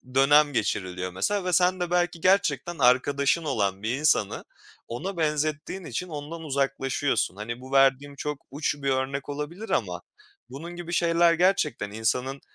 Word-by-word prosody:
dönem 145 Hz, +2 st, +5 dB
geçiriliyor 95 Hz, -5 st, -2 dB
mesela 180 Hz, -, -1 dB
ve 180 Hz, -, -1 dB
sen 180 Hz, +1 st, +3 dB
de 175 Hz, -1 st, -2 dB
belki 175 Hz, -1 st, 0 dB
gerçekten 185 Hz, -2 st, +2 dB
arkadaşın 140 Hz, +5 st, +3 dB
olan 100 Hz, -9 st, -1 dB
bir 115 Hz, +3 st, 0 dB
insanı 140 Hz, -8 st, +1 dB, 0.4 s
ona 175 Hz, +11 st, -5 dB
benzettiğin 155 Hz, +3 st, -1 dB
için 180 Hz, -, -4 dB
ondan 155 Hz, +2 st, -6 dB
uzaklaşıyorsun. 135 Hz, -, -1 dB
Hani, 115 Hz, +4 st, -6 dB
bu 130 Hz, +1 st, -11 dB
verdiğim 135 Hz, +1 st, +3 dB
çok 150 Hz, 0 st, -5 dB
uç 145 Hz, +1 st, -1 dB
bir 140 Hz, -1 st, -2 dB
örnek 135 Hz, +2 st, -2 dB
olabilir 150 Hz, +9 st, -5 dB
ama -, -, -1 dB, 0.5 s
bunun 170 Hz, +6 st, -8 dB
gibi 175 Hz, 0 st, -6 dB
şeyler 170 Hz, 0 st, +4 dB
gerçekten 165 Hz, -, +1 dB
insanın 125 Hz, +5 st, -1 dB
145 Hz, 150 wpm, -26 LUFS, 130-170 Hz, 0.5 s, dönem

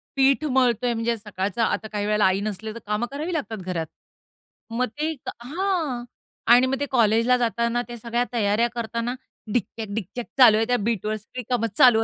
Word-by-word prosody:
पीठ 275 Hz, +2 st, +4 dB
मळतोय 250 Hz, -3 st, +2 dB
म्हणजे 230 Hz, +1 st, 0 dB
सकाळचा 205 Hz, +1 st, -2 dB
आता 220 Hz, -, -1 dB
काही 205 Hz, -1 st, -2 dB
वेळेला 210 Hz, -1 st, +3 dB
आई 190 Hz, +1 st, +3 dB
नसली, 215 Hz, +1 st, -4 dB
तर 230 Hz, -, -8 dB
कामं 210 Hz, +3 st, 0 dB
करावी 310 Hz, +5 st, -3 dB
लागतात 255 Hz, -8 st, -3 dB
घरात. 165 Hz, -3 st, -2 dB, 0.8 s
मग 250 Hz, +2 st, +1 dB
ते 315 Hz, +1 st, 0 dB, 0.3 s
हां. 320 Hz, -4 st, -1 dB, 0.5 s
आणि 250 Hz, +2 st, +6 dB
मग 270 Hz, +1 st, -1 dB
ते 285 Hz, -, 0 dB
कॉलेजला 230 Hz, +1 st, +4 dB
जाताना 235 Hz, 0 st, 0 dB
त्या 240 Hz, 0 st, -7 dB
सगळ्या 235 Hz, +2 st, -1 dB
तयाऱ्या 220 Hz, +1 st, +2 dB
करताना 235 Hz, +1 st, -2 dB, 0.4 s
डिक्चक 220 Hz, -2 st, -2 dB
डिक्चक 225 Hz, +3 st, -4 dB
चालू 230 Hz, -5 st, +8 dB
आहे. 225 Hz, -, +2 dB
त्या 245 Hz, 0 st, +2 dB
बीटवर 215 Hz, 0 st, -1 dB
सगळी 225 Hz, +4 st, -8 dB
कामं 235 Hz, -2 st, +1 dB
चालू 230 Hz, -3 st, +7 dB
235 Hz, 175 wpm, -24 LUFS, 215-250 Hz, 0.8 s, चालू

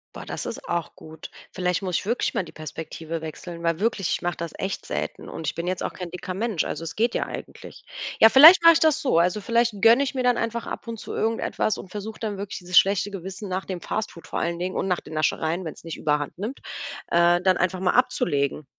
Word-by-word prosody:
Boah, -, -, -8 dB
das -, -, -5 dB
ist -, -, -6 dB
auch 170 Hz, -3 st, -2 dB
gut. 160 Hz, 0 st, -11 dB, 0.2 s
Vielleicht 180 Hz, -1 st, 0 dB
muss 185 Hz, -3 st, -2 dB
ich -, -, -5 dB
wirklich 235 Hz, +4 st, 0 dB
mal 205 Hz, -, 0 dB
die -, -, -12 dB
Perspektive 160 Hz, +1 st, -6 dB
wechseln. 170 Hz, +2 st, -8 dB
Weil 165 Hz, 0 st, 0 dB
wirklich, 205 Hz, -3 st, 0 dB
ich -, -, -1 dB
mache 175 Hz, 0 st, -1 dB
das 170 Hz, -1 st, -5 dB
echt 195 Hz, -, -4 dB
selten -, -, -4 dB
und 160 Hz, -, -6 dB
ich -, -, -1 dB
bin 170 Hz, +1 st, -4 dB
jetzt 185 Hz, 0 st, -2 dB
auch -, -, -3 dB
kein 180 Hz, -2 st, -7 dB
dicker 180 Hz, +1 st, -5 dB
Mensch, 210 Hz, -2 st, -1 dB
also -, -, -4 dB
es 165 Hz, -1 st, -6 dB
geht 230 Hz, +2 st, +1 dB
ja -, -, 0 dB
eigentlich. -, -, -9 dB, 0.3 s
Ja, 220 Hz, -, +10 dB
vielleicht 315 Hz, +10 st, +10 dB
mache 335 Hz, 0 st, +9 dB
ich 325 Hz, -, +2 dB
das 315 Hz, -3 st, +3 dB
so, 255 Hz, -, +3 dB
also 180 Hz, +4 st, +2 dB
vielleicht 230 Hz, -1 st, +1 dB
gönne 230 Hz, +4 st, +6 dB
ich 280 Hz, -, -3 dB
mir 260 Hz, -2 st, -1 dB
dann 245 Hz, -1 st, +3 dB
einfach 230 Hz, 0 st, -2 dB
ab -, -, -6 dB
und 230 Hz, -1 st, -5 dB
zu -, -, -7 dB
irgendetwas 225 Hz, -1 st, 0 dB
und 190 Hz, -, -9 dB
versuch 210 Hz, +2 st, -6 dB
dann 210 Hz, -3 st, -4 dB
wirklich 200 Hz, +1 st, -5 dB
dieses 180 Hz, 0 st, 0 dB
schlechte 200 Hz, +1 st, +4 dB
Gewissen 195 Hz, +2 st, -7 dB
nach 185 Hz, +1 st, -2 dB
dem 185 Hz, -2 st, -5 dB
Fast 220 Hz, 0 st, -3 dB
Food 170 Hz, -, -13 dB
vor -, -, -3 dB
allen 170 Hz, 0 st, -2 dB
Dingen 185 Hz, +1 st, -3 dB
und -, -, -1 dB
nach 180 Hz, -, +1 dB
den 155 Hz, -, -11 dB
Naschereien, 160 Hz, +3 st, 0 dB
wenn's 160 Hz, -, -8 dB
nicht 165 Hz, -, -6 dB
überhand 150 Hz, 0 st, -1 dB
nimmt, 220 Hz, +9 st, -5 dB, 0.5 s
äh, 170 Hz, +1 st, +4 dB
dann 185 Hz, 0 st, +3 dB
einfach 185 Hz, 0 st, 0 dB
mal 180 Hz, -1 st, +2 dB
abzulegen. 150 Hz, -, +1 dB
185 Hz, 245 wpm, -24 LUFS, 170-220 Hz, 0.5 s, Ja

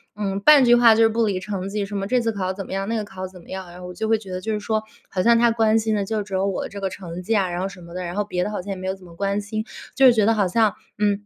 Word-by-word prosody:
嗯， 195 Hz, -2 st, -2 dB
半 290 Hz, +4 st, +7 dB
句 240 Hz, -, +6 dB
话 235 Hz, -2 st, +7 dB
就 225 Hz, -, +3 dB
是 225 Hz, -, +5 dB
不 230 Hz, +1 st, +1 dB
离 195 Hz, -3 st, -1 dB
成 195 Hz, -1 st, -4 dB
绩 205 Hz, 0 st, -2 dB
什 205 Hz, +1 st, -7 dB
么 195 Hz, -, -2 dB
这 250 Hz, +4 st, +2 dB
次 225 Hz, -1 st, 0 dB
考 190 Hz, -2 st, -2 dB
怎 195 Hz, -, -6 dB
么 -, -, -7 dB
样？ 195 Hz, +1 st, -2 dB
那 230 Hz, -, 0 dB
个 215 Hz, -, -2 dB
考 185 Hz, -3 st, -7 dB
怎 185 Hz, -1 st, -14 dB
么 -, -, -19 dB
样， 190 Hz, -1 st, -6 dB
然 180 Hz, +1 st, -11 dB
后 180 Hz, -, -7 dB
我 180 Hz, -, -8 dB
就 220 Hz, +5 st, -3 dB
会 225 Hz, -, +4 dB
觉 195 Hz, -3 st, -11 dB
得 185 Hz, -, -3 dB
就 220 Hz, +3 st, -2 dB
是 210 Hz, -, -1 dB
说 215 Hz, +1 st, -1 dB, 0.3 s
好 185 Hz, -, -1 dB
像 235 Hz, +2 st, +5 dB
她 235 Hz, 0 st, +5 dB
关 225 Hz, -1 st, +3 dB
心 220 Hz, 0 st, 0 dB
的 200 Hz, -1 st, -1 dB
就 215 Hz, +1 st, -2 dB
只 195 Hz, -1 st, -11 dB
有 190 Hz, +1 st, +1 dB
我 195 Hz, -, -2 dB
的 -, -, -6 dB
这 200 Hz, -, -8 dB
个 195 Hz, -, -1 dB
成 180 Hz, -1 st, -7 dB
绩 225 Hz, -, -1 dB
呀， 195 Hz, -4 st, +2 dB
然 175 Hz, 0 st, -3 dB
后 190 Hz, -, -1 dB
什 180 Hz, -2 st, -13 dB
么 170 Hz, 0 st, -12 dB
的， 180 Hz, -, -3 dB
然 175 Hz, +1 st, -5 dB
后 210 Hz, -, +1 dB
别 180 Hz, -3 st, -2 dB
的 -, -, -3 dB
好 205 Hz, -, -3 dB
像 195 Hz, -, -10 dB
也 -, -, -2 dB
没 185 Hz, 0 st, -7 dB
有 190 Hz, -, 0 dB
怎 190 Hz, -, -18 dB
么 170 Hz, -1 st, -14 dB
关 200 Hz, +2 st, -1 dB
心， 215 Hz, +2 st, -4 dB, 0.3 s
就 265 Hz, -2 st, +7 dB
觉 220 Hz, -3 st, +2 dB
得 225 Hz, -, +4 dB
好 205 Hz, -3 st, +2 dB
像， 215 Hz, +2 st, +2 dB, 0.2 s
嗯， 205 Hz, 0 st, +1 dB
200 Hz, 395 characters per minute, -22 LUFS, 185-220 Hz, 0.3 s, 半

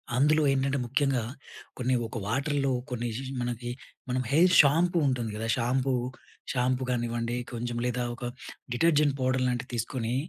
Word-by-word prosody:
అందులో 150 Hz, +4 st, +4 dB
ఏంటంటే, 135 Hz, +1 st, +1 dB
ముఖ్యంగా, 130 Hz, 0 st, +1 dB, 0.5 s
కొన్ని 130 Hz, 0 st, +1 dB
ఒక 115 Hz, -, -6 dB
వాటర్‌లో, 135 Hz, +3 st, 0 dB, 0.2 s
కొన్ని 120 Hz, -1 st, -3 dB
ఎసేసి 130 Hz, +4 st, -5 dB
మనకి, 120 Hz, 0 st, -3 dB, 0.4 s
మనం 125 Hz, +1 st, 0 dB
హెయిర్ 180 Hz, +5 st, +5 dB
షాంపూ 165 Hz, +5 st, +3 dB
ఉంటుంది 120 Hz, -4 st, -1 dB
కదా! 110 Hz, +1 st, -3 dB
షాంపూ, 130 Hz, +2 st, +1 dB, 0.6 s
షాంపూ 130 Hz, 0 st, +1 dB
గానివ్వండి, 120 Hz, -1 st, -1 dB, 0.2 s
కొంచెం 120 Hz, 0 st, -3 dB
లేదా, 125 Hz, 0 st, -1 dB
ఒక 125 Hz, -, -11 dB, 0.5 s
డిటర్జెంట్ 150 Hz, 0 st, +3 dB
పౌడర్ 130 Hz, 0 st, +1 dB
లాంటివి 125 Hz, 0 st, -2 dB
తీసుకొని, 115 Hz, +1 st, -2 dB
125 Hz, 140 wpm, -28 LUFS, 120-135 Hz, 0.6 s, హెయిర్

